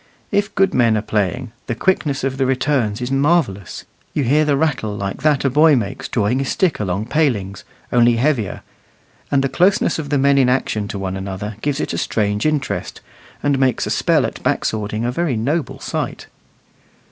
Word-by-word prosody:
If 205 +1 0
good 195 0 +3
men 115 -3 +3
are 105 - -2
playing, 110 +4 -1 0.2
the 115 - -2
quickness 145 -3 0
of 135 0 -1
the 135 - +1
returns 130 -5 0
is 125 - -3
marvellous: 135 - 0 0.3
you 145 - +1
hear 150 +5 +3
the 145 -2 +2
rattle 130 -9 -1
like 100 +5 -4
that 150 -2 +2
a - - +4
boy 150 +2 +5
makes 130 +3 -3
drawing 115 +3 0
his 135 - -2
stick 185 -4 +1
along 100 0 -2
palings, 115 -9 0 0.3
only 120 -1 +5
heavier; 120 -5 0 0.7
and 135 -1 +2
the - - +2
closeness 175 +3 +2
of 145 -3 -5
the 145 - +2
men 140 0 +4
in 130 -2 +4
action 110 -5 0
to 100 - -5
one 95 -1 -3
another 95 +2 -5
gives 145 0 -1
it - - -2
a - - -2
strange 105 +3 0
interest, 150 -4 -2 0.4
and 140 -2 +2
makes 130 -3 +1
a - - -3
spell - - +2
at - - -6
back - - 0
swording 110 +1 -2
a 120 - 0
very 145 -3 -1
noble 145 +8 -1
sight. - - -4
130 Hz, 195 wpm, -19 LUFS, 105-145 Hz, 0.7 s, boy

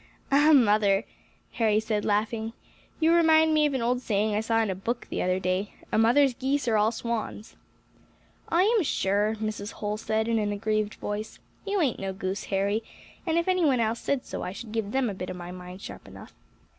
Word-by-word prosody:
"Ah 295 +3 +5
mother!" 210 -6 +4 0.5
Harry 215 -3 +2
said, 215 -1 -1
laughing, 220 +2 -1 0.5
"you 325 0 +4
remind 320 -1 +5
me 305 -1 +4
of 280 - -2
an 250 - -1
old 245 +1 +1
saying 215 -2 0
I 210 - +1
saw 225 +1 +1
in 210 - -1
a - - -1
book 230 +6 -4
the - - -1
other 185 +1 +1
day, 185 +2 -2 0.2
'A - - +2
mother's 250 +4 +4
geese 270 +1 -1
are 225 - +2
all 215 +1 +3
swans.'" 230 -2 -4 0.9
"I 340 +2 +3
am 445 +1 +3
sure," 210 - +1
Mrs. 215 -1 -4
Holl 210 0 -3
said, 220 0 -1
in 230 -1 +1
an 205 -1 -1
aggrieved 215 0 -1
voice, 210 +1 -5 0.3
"you 400 0 0
ain't 270 -8 0
no 195 -1 -3
goose, 190 +1 -4
Harry, 200 +2 0 0.5
and 325 0 +1
if 340 - +1
any 370 -1 +2
one 270 -5 +3
else 225 0 0
said 280 -3 -1
so - - -5
I 180 - -4
should 215 +2 -9
give 220 -2 -2
them 265 0 +1
a 205 - -2
bit 185 -1 -6
of - - -5
my 175 0 -7
mind 180 +1 -10
sharp - - -9
enough." - - -12
220 Hz, 210 wpm, -27 LUFS, 205-265 Hz, 0.9 s, Ah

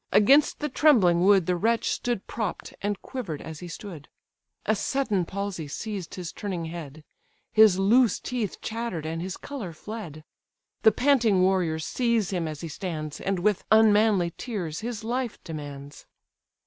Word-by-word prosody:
Against 275 +9 +5
the 300 - 0
trembling 230 - +4
wood 195 -3 +5
The 180 - +1
wretch 230 +6 +1
stood 240 -5 -2
propp'd, 215 -5 -4
and 205 -1 -2
quiver'd 200 - -5
as 160 -1 -8
he 180 - -8
stood; 170 -3 -9 0.6
A 215 - +2
sudden 210 -5 0
palsy 195 -4 -4
seized 195 +3 -5
his 180 -3 -5
turning 185 -5 -4
head; 155 -2 -8 0.5
His 215 -4 +6
loose 225 +5 +4
teeth 235 -6 -3
chatter'd, 225 -8 -4
and 165 +1 -3
his 185 +1 -4
colour 230 -12 -6
fled; 165 -4 -8 0.6
The 220 - +7
panting 230 -7 +3
warriors 175 -4 +1
seize 235 -6 0
him 175 -4 -1
as 155 -2 -6
he 165 - -4
stands, 155 -2 -5
And 195 -1 -1
with 200 +2 +1
unmanly 210 -5 +4
tears 180 -10 -4
his 225 -1 -5
life 240 0 -2
demands. 145 -3 -8
195 Hz, 155 wpm, -26 LUFS, 165-225 Hz, 0.6 s, The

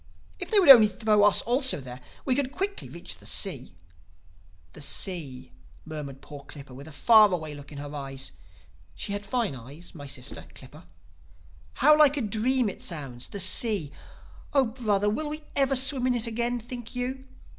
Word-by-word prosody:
If - - -6
they 435 - +4
would 360 - +4
only 225 -5 +9
throw 210 0 +1
us 205 -2 +4
also 255 - +2
there, 125 -1 -9 0.2
we 260 - +2
could 265 0 -1
quickly 395 +6 -4
reach - - -8
the - - -11
sea.' 135 - -2 1.0
"'The 150 - -11
Sea!' 140 - -3 0.3
murmured 145 -4 -8
poor 145 -1 -10
Clippa 140 -3 -12
with 140 +4 -11
a - - -11
far 215 +6 +6
away 160 -4 -3
look 145 0 -11
in 145 - -9
her 145 +1 -7
eyes 135 -2 -6 0.6
(she 200 - -4
had 205 0 -5
fine 235 - -1
eyes, 140 +8 -11
had - - -19
my 145 -3 -9
sister, 135 -2 -5
Clippa). - - -13 0.9
'How 300 +4 +5
like 295 -1 +5
a - - 0
dream 230 +3 0
it 195 - -6
sounds—the 140 +1 -6
Sea! 190 - +2 0.6
Oh 275 -2 +4
brother, 215 -4 -1
will 295 +9 -1
we 305 +1 -5
ever 275 -1 +2
swim 260 0 +2
in 250 - +1
it 235 -1 0
again, 235 +1 -2
think 240 +1 -9
you? 260 +2 -4
210 Hz, 180 wpm, -26 LUFS, -, 1.0 s, only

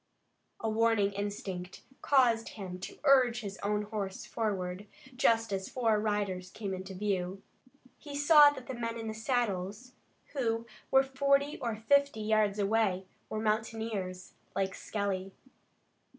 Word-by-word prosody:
A 225 - -2
warning 220 -2 +3
instinct 195 -3 -5 0.2
caused 240 -5 +3
him 185 -3 -6
to 190 - -8
urge 260 -4 +5
his 200 -2 -7
own 210 +1 0
horse 205 -2 -4
forward, 200 -3 -3 0.3
just 225 -3 +2
as 190 0 -3
four 225 -4 +2
riders 200 -4 -1
came 200 0 -5
into 190 +1 -6
view. 190 -1 -2 0.6
He 290 -2 -8
saw 290 0 +8
that 270 -3 -7
the 260 - -5
men 230 -1 -3
in 225 -1 -5
the 220 - -3
saddles, 220 -1 -2 0.4
who 230 -5 0 0.2
were 265 0 +6
forty 280 +2 +1
or 230 -2 -2
fifty 280 +1 +2
yards 215 -1 +2
away, 200 -2 +1 0.2
were 215 - -3
mountaineers, 215 -4 -2 0.2
like 190 -1 0
Skelly. 195 -2 -3
215 Hz, 135 wpm, -31 LUFS, 195-235 Hz, 0.6 s, saw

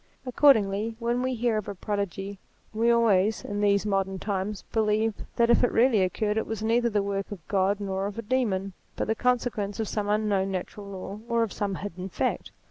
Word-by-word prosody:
Accordingly 225 -5 +3
when 240 +1 0
we 255 0 -1
hear 235 -1 +1
of 210 - -8
a 200 - -5
prodigy 200 0 -3 0.3
we 225 +2 +2
always, 220 -3 +3
in 205 0 -3
these 200 0 +3
modern 195 -2 0
times, 200 +1 -3
believe 220 0 +2 0.2
that 235 0 +4
if 235 - +4
it 245 - +3
really 230 -3 +4
occurred 210 +4 0
it 220 - -1
was 220 -1 -4
neither 235 +2 +2
the 205 -2 +1
work 200 0 -3
of 180 -7 -9
God 195 +1 +1
nor 195 -1 -2
of 205 - -7
a 230 - -4
demon, 205 -5 0 0.2
but - - -1
the 220 - +1
consequence 235 -4 0
of 220 - -1
some 205 0 -2
unknown 205 -2 +1
natural 195 +2 -5
law 195 +1 -7
or 235 0 +2
of 220 - -3
some 200 -2 -2
hidden 185 -1 -6
fact. - - -2
210 Hz, 205 wpm, -27 LUFS, 195-230 Hz, 0.3 s, that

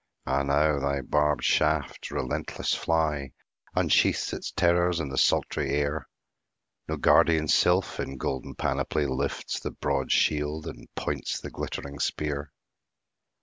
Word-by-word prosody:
—Ah 65 +1 +1
now 70 +1 +2
thy 70 0 0
barbed 75 +1 +1
shaft, 75 -2 +1
relentless 65 - -2
fly, 75 -4 0 0.4
Unsheaths - - +2
its - - -4
terrors 85 -1 +2
in 75 -3 -3
the 65 - -5
sultry 70 - +2
air! 75 +1 -1 0.8
No - - -2
guardian 80 -1 +4
sylph, 90 +5 +3
in 65 - -4
golden 65 0 -4
panoply, 75 - 0
Lifts 65 -2 -2
the - - -4
broad 70 -2 -2
shield, 75 +1 +1
and - - -8
points - - -2
the - - -8
glittering 70 0 -5
spear. 75 -1 -2
75 Hz, 130 wpm, -27 LUFS, 70-80 Hz, 0.8 s, guardian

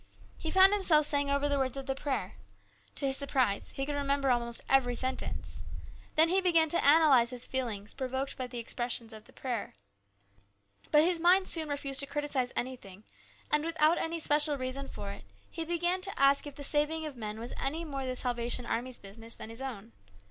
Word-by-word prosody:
He 320 - -3
found 380 +3 +6
himself 330 -7 +4
saying 285 -1 0
over 280 +1 +1
the 285 -1 +1
words 265 0 -1
of 270 - -5
the 270 - -1
prayer. 265 -8 -3 0.6
To - - -1
his 270 0 +1
surprise 255 -7 0
he 270 - -2
could 295 - -3
A 285 - -1
CHANGE. 280 - -3
97 - - -5 0.2
remember 265 - +4
almost 235 -1 0
every 250 -2 +3
sentence. 260 +2 -2 0.5
Then 320 +1 +6
he 380 +2 +3
began 335 -4 +3
to 340 - +1
analyse 285 -5 +6
his 245 -1 0
feelings, 225 -6 -3
provoked 265 +1 -3
by 255 - -4
the 245 0 -8
expressions 235 -1 -2
of 215 -1 -11
the - - -18
prayer. 245 - -4 1.1
But 300 0 +6
his 345 0 +2
mind 365 +3 +5
soon 315 -3 -2
refused 280 -1 -2
to 280 - +2
criticise 290 -4 -1
anything, 215 -6 -5 0.5
and, 300 0 +3
without 325 0 +2
any 330 +1 -2
special 295 -1 +2
reason 260 +1 -4
for 200 -6 -6
it, - - -9 0.3
he 330 - -3
began 345 +2 0
to 390 +1 -3
ask 275 +1 +4
if 285 - -9
the 285 - -7
saving 300 +3 0
of 300 -3 -6
men 215 -2 -5
was 235 +2 -6
any 315 +5 -2
more 275 -3 -4
the 255 - -2
Salvation 245 0 -1
Army's 240 +2 -2
business 225 +3 -7
than 220 - -9
his 230 +3 -7
own. 235 -5 -6
275 Hz, 205 wpm, -31 LUFS, 245-305 Hz, 1.1 s, found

